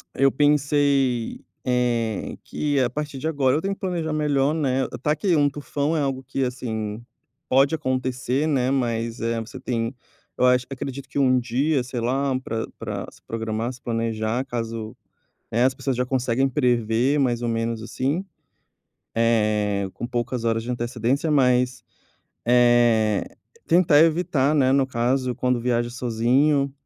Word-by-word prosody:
eu 135 0 +4
pensei, 140 -4 +2 0.3
eh, 120 -4 0
que 145 -2 -1
"a 125 -2 +2
partir 145 +1 -5
de 155 - -2
agora 140 -4 +2
eu 155 - 0
tenho 195 +2 -1
que - - -11
planejar 175 -4 -2
melhor, 145 -1 +1
né". 135 -4 0
Tá 150 +1 +1
que 175 +2 +1
um 145 -1 +3
tufão 145 +2 -2
é - - +1
algo 135 -1 -2
que, 135 +1 -2
assim, 110 -4 -3 0.5
pode 135 +4 +4
acontecer, 130 0 -1
né, 130 -3 +1
mas, 115 -3 -1
eh, 115 0 -1
você 110 +1 -8
tem 115 0 -2 0.4
eu 125 - +3
acho 125 -1 +3
acredito 135 +1 -6
que 145 - -3
um 130 -2 +4
dia, 130 +3 0
sei 125 -1 -5
lá, 135 +3 0
pra 115 0 -3
pra - - -4
se - - -20
programar, 110 +1 -3
se 125 - -13
planejar, 115 +1 -1
caso 115 -3 -5 0.6
né, 120 +3 +3
as 130 - +3
pessoas 135 -2 -2
já 125 - +1
conseguem 130 0 +1
prever 125 +1 +1
mais 120 -3 +1
ou 120 - -1
menos, 115 0 -2
assim, 140 +10 -2 0.9
eh, 105 -3 +1
com - - -5
poucas 120 0 -2
horas 115 0 +1
de 120 - -7
antecedência, 120 +5 -1
mas, 125 -3 +2 0.6
eh, 120 -3 +4 0.4
tentar 165 -4 +5
evitar, 155 -3 +2
né, 130 -3 +3
no 135 -1 +3
caso, 125 +1 0
quando 125 -1 0
viaja 120 -1 0
sozinho 130 +4 +1
125 Hz, 155 wpm, -23 LUFS, 115-140 Hz, 0.9 s, tentar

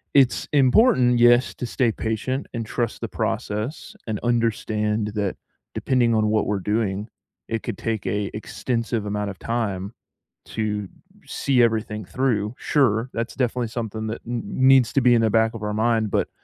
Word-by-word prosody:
it's 135 -3 +4
important, 130 - +4
yes, 120 +1 +5
to 125 - -4
stay 120 -1 +1
patient 110 +5 -3
and 115 -1 -3
trust 115 +1 -3
the - - -3
process 110 - -3
and 110 -2 -2
understand 110 -2 0
that 100 -3 -1 0.4
depending 120 -3 +2
on 110 -1 +2
what 110 0 +1
we're 100 0 0
doing, 105 0 -1 0.4
it 115 -1 -2
could - - -5
take 110 -2 -3
a 105 -1 -1
extensive 115 0 -3
amount 105 0 -2
of 95 - -8
time 105 -3 -3 0.5
to 105 -2 -3 0.4
see 130 -3 +1
everything 110 -2 0
through 110 0 -1
sure, 125 -4 +1
that's 115 0 -3
definitely 125 -2 0
something 110 -1 -4
that 110 - -5
n 120 -1 -2
needs 130 -2 +4
to 135 - +3
be 125 0 +5
in 115 - +4
the 110 - +3
back 110 +1 +2
of 115 - -7
our 105 0 -2
mind, 110 0 +1
but - - 0
115 Hz, 170 wpm, -23 LUFS, 105-120 Hz, 0.5 s, yes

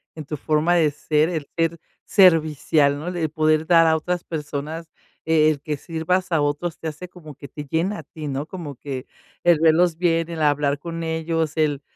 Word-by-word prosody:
en 155 - -7
tu 150 +1 -5
forma 155 +4 +1
de 160 -4 +3
ser 150 +1 +1
el 160 -5 -4
ser 165 0 +1 0.3
servicial, 155 -6 +4
¿no? 155 +5 -5
El 170 -3 -2
poder 155 0 +1
dar 165 -1 +6
a 160 0 +3
otras 175 +2 -3
personas, 155 +1 -5 0.4
eh, 155 -1 +4
el 150 -2 -1
que 150 +1 -3
sirvas 180 +4 -2
a 165 - +3
otros 145 +4 -2
te 165 - -5
hace 160 +4 -7
como 155 -5 -12
que 140 - -11
te 150 +3 -8
llena 180 +7 -1
a - - -9
ti, 155 -4 -8
¿no? 140 +2 -3
Como 165 -5 -7
que 135 0 -6 0.4
el 170 -3 +4
verlos 165 +1 +4
bien, 165 -1 +1
el 165 -2 -5
hablar 145 -1 +1
con 165 +1 -6
ellos, 160 -1 -1
el 150 -3 +1
160 Hz, 200 wpm, -22 LUFS, 150-170 Hz, 0.4 s, dar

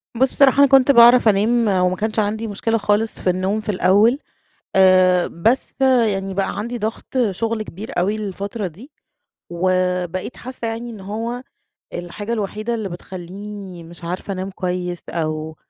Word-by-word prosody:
بُصّ، 260 +2 +2
بصراحة 275 0 +4
أنا 280 - +7
كنت 270 0 +5
باعرف 240 -1 +7
أنام 220 +3 +3 0.2
وما 180 0 +1
كانش 215 +2 -2
عندي 215 +2 -1
مشكلة 225 +3 -1
خالص 210 +1 0
في 185 - +1
النوم 190 +4 0
في 210 - -8
الأول 210 +7 +3 0.6
آآ، 185 -1 +5
بس 225 +10 0 0.4
يعني 195 0 -4
بقى 195 +1 -2
عندي 235 +3 -4
ضغط 220 +1 -4 0.3
شغل 225 +3 -2
كبير 215 +5 -9
أوي، 200 +5 +1
الفترة 200 0 -4
دي 210 - -11 0.6
وبقيت 180 +2 -1
حاسة 245 -2 -6
يعني 230 +1 -5
إن 215 -3 -10
هو 225 +5 -4 0.5
الحاجة 190 +6 -5
الوحيدة 215 +2 -3
اللي 215 -4 -3
بتخلّيني 185 +1 -8
مش 170 +1 -12
عارفة 180 +3 -4
أنام 190 +1 -4
كويس، 180 -1 -3
أو 155 -1 -3
205 Hz, 155 wpm, -20 LUFS, 185-225 Hz, 0.6 s, أنا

